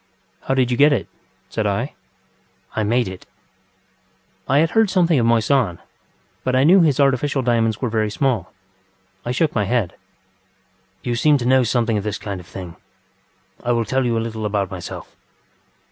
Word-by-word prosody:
ŌĆ£How 135 - +1
did 130 -2 +2
you 120 - 0
get 145 +3 +6
it? 125 -9 0
ŌĆØ - - -33
said - - 0
I. - - -2 0.8
ŌĆ£I 110 -2 0
made 120 0 +2
it. 95 -1 -9
ŌĆØ - - -41 0.3
I 135 - +3
had 160 +2 +3
heard 225 -2 +3
something 175 -5 +3
of 115 - +2
Moissan, 115 -4 +2 0.7
but 130 - 0
I 130 - +4
knew 180 +6 +6
his 150 -5 +2
artificial 140 0 +2
diamonds 115 -3 +1
were 125 - +1
very 110 -1 0
small. 115 - -1 0.7
I 120 - -2
shook 150 +5 +1
my 105 -3 0
head. 115 -5 0 1.1
ŌĆ£You 120 -2 -1
seem 150 +1 +4
to 120 - -4
know 130 +1 +4
something 115 -2 +1
of - - -6
this 105 -1 -3
kind 100 -3 -5
of 90 - -13
thing. 90 -3 -9 0.9
I 120 - +1
will 115 -1 0
tell 130 +4 0
you 120 -2 0
a 115 - -1
little 110 -2 -3
about 100 -1 -1
myself. 90 -2 -8
120 Hz, 185 wpm, -21 LUFS, 110-135 Hz, 1.1 s, get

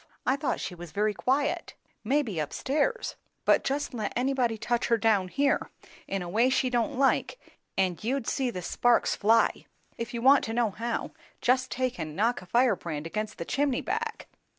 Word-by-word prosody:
"I 260 - +3
thought 280 -1 -1
she 185 - -4
was 175 -2 -9
very 210 +1 +1
quiet." 270 +6 0 0.3
"Maybe, 230 - 0
up 150 - -4
stairs. 310 - -1 0.3
But - - +4
just 280 +1 -2
let 215 -4 -2
anybody 245 -2 +1
touch 240 +2 0
her 230 - +3
down 215 -4 +2
here, 275 +8 +1 0.4
in 195 -1 -2
a - - -6
way 225 +8 +3
she 260 -1 +1
don't 245 +3 0
like, 275 - +2 0.4
and 185 0 0
you'd 255 +2 -1
see 265 -1 0
the 180 -6 -5
sparks 245 +7 +2
fly! 225 +2 +2 0.3
If 230 0 -4
you 235 - -3
want 275 +2 +6
to 225 - -4
know 235 -3 +2
how, 230 +4 -3 0.3
just 255 +1 +2
take 255 -5 -2
and 155 -2 -5
knock 230 +4 +1
a 180 - -13
firebrand 185 - +1
against 215 +6 -4
the 170 - -5
chimney 275 +2 0
back." 455 0 -3
235 Hz, 185 wpm, -28 LUFS, 205-265 Hz, 0.4 s, want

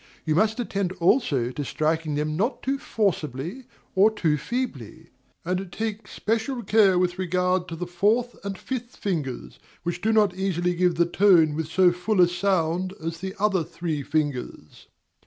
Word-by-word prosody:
You 155 - +1
must 215 +7 +2
attend 200 -6 -2
also 170 - +2
to 145 - -4
striking 155 +3 -1
them 150 +1 -1
not 220 - -1
too 270 +1 -1
forcibly 180 - -2 0.3
or 200 +3 +6
too 170 -8 0
feebly, 155 - -5 0.3
and 180 +1 -2
take 215 +2 -4
special 230 +3 -2
care 200 -3 +4
with 180 0 0
regard 180 0 0
to 165 - -6
the 175 +2 -4
fourth 210 +8 +1
and 195 -1 -4
fifth 245 +1 -5
fingers, 155 -10 -4 0.2
which 175 +1 -3
do 220 - +2
not 210 -4 +4
easily 180 -2 0
give 175 0 +2
the 170 +1 +3
tone 175 -4 +4
with 155 0 -3
so 180 +2 +4
full 180 +4 -1
a 175 - +7
sound 180 0 0
as 165 +1 -5
the 190 +1 -5
other 195 -4 +2
three 160 -3 -4
fingers. 140 - -3
180 Hz, 165 wpm, -25 LUFS, 160-210 Hz, 0.3 s, a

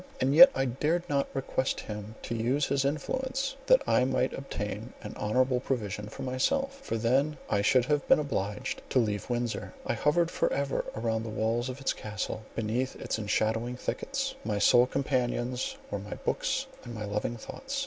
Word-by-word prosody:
And 135 +2 +2
yet 265 - +11
I 135 - +1
dared 150 +8 0
not 140 -1 +1
request 135 -1 -1
him 105 0 -7
to - - -3
use 125 +5 +1
his 140 -1 +1
influence 260 - -1
that - - +6
I - - +4
might 130 0 +1
obtain 110 -3 -5
an 105 - -6
honourable 125 +4 +2
provision 105 -6 -3
for - - -7
myself—for 270 - -1
then 135 +6 +2
I 100 - +3
should 120 +4 +4
have 145 +1 0
been - - +7
obliged 105 -9 -2
to - - +1
leave 105 -4 +1
Windsor. 120 - -2
I - - 0
hovered 170 +3 +2
for - - +1
ever 140 0 -1
around 110 0 0
the 115 - -5
walls 115 +3 0
of 130 +2 -6
its 135 - 0
Castle, 105 0 -4
beneath 115 +4 -1
its - - -3
enshadowing 110 +3 0
thickets; - - -2
my 105 -1 -1
sole 120 +4 +6
companions 125 -2 -1
were 100 - -1
my 105 +2 -6
books - - -1 0.2
and 120 -1 -7
my 110 -1 -4
loving 105 +3 -2
thoughts. 270 - -5
125 Hz, 180 wpm, -29 LUFS, 110-140 Hz, 0.2 s, yet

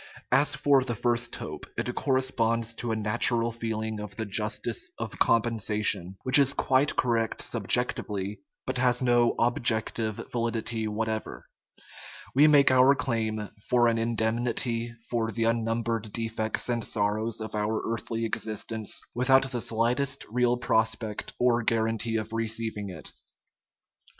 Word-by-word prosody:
As 145 +1 +3
for 140 -2 +3
the 120 -2 -2
first 120 +1 0
hope, - - -7
it 125 - -2
corresponds 115 -4 0
to 115 0 -4
a - - 0
natural 115 +2 +2
feeling 110 -1 -4
of 105 -2 -7
the 110 - -3
justice 105 +2 -2
of - - -6
compensation, 110 -5 +1
which 130 +2 +7
is 140 0 +3
quite 135 +2 +2
correct 115 -3 0
subjec - - +1
tively, 100 0 -5 0.3
but 130 -1 -2
has 125 0 +2
no 120 -1 +3
objective 115 -2 +1 0.2
validity 115 -1 -2
whatever. 110 +1 -4 0.9
We 145 +4 +6
make 145 -3 +6
our 130 +2 +6
claim 110 -5 -2 0.2
for 120 -1 +4
an 115 -1 +1
indemnity 115 +1 -1 0.2
for 115 -2 -1
the 115 0 -2
unnumbered 115 -1 -1
defects 110 -1 -2
and 120 -2 -1
sorrows 110 +2 -1
of 110 0 -6
our 105 +1 -1
earthly 115 0 -3
existence, 110 0 -2
without 130 +2 +3
the 120 -2 -2
slightest 120 +6 0
real 125 0 +2
prospect 110 -3 -1
or 120 -1 +2
guarantee 115 0 0
of 110 0 -3
receiving 110 -2 -2
it. 85 -4 -9
115 Hz, 135 wpm, -27 LUFS, 110-120 Hz, 0.9 s, which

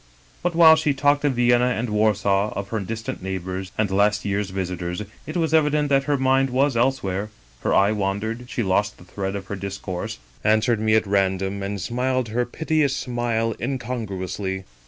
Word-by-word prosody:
" - - -30
But 175 -1 -1
while 160 -1 +8
she 155 -3 +1
talked 145 +1 +2
of 140 - +2
Vienna 120 0 +4
and 115 0 -2
Warsaw, 105 -1 +2
of 100 0 -4
her 110 - -1
distant 110 +2 -5
neighbors, 95 0 -4
and 105 -3 +1
last 105 +2 +2
year's 100 0 -1
visitors, 90 0 -3 0.2
it 155 - -3
was 160 -2 0
evident 150 -2 +3
that 135 -1 +3
her 145 -1 +1
mind 135 0 +2
was 135 +1 +2
elsewhere; 105 -5 0 0.3
her - - -1
eye 100 +2 +4
wandered, 110 +4 -2
she 120 - -1
lost 105 +2 +1
the - - -15
thread 95 +2 -4
of 100 -1 -5
her 100 - -5
discourse, 95 -2 -5 0.3
answered 110 +2 +3
me 110 0 +3
at 110 - +3
random, 95 0 0
and 100 +1 -3
smiled 125 +3 -1
her 120 +3 0
piteous 155 0 0
smile 120 -2 -1
incongruously. 100 -7 -3
110 Hz, 180 wpm, -23 LUFS, 95-130 Hz, 0.3 s, while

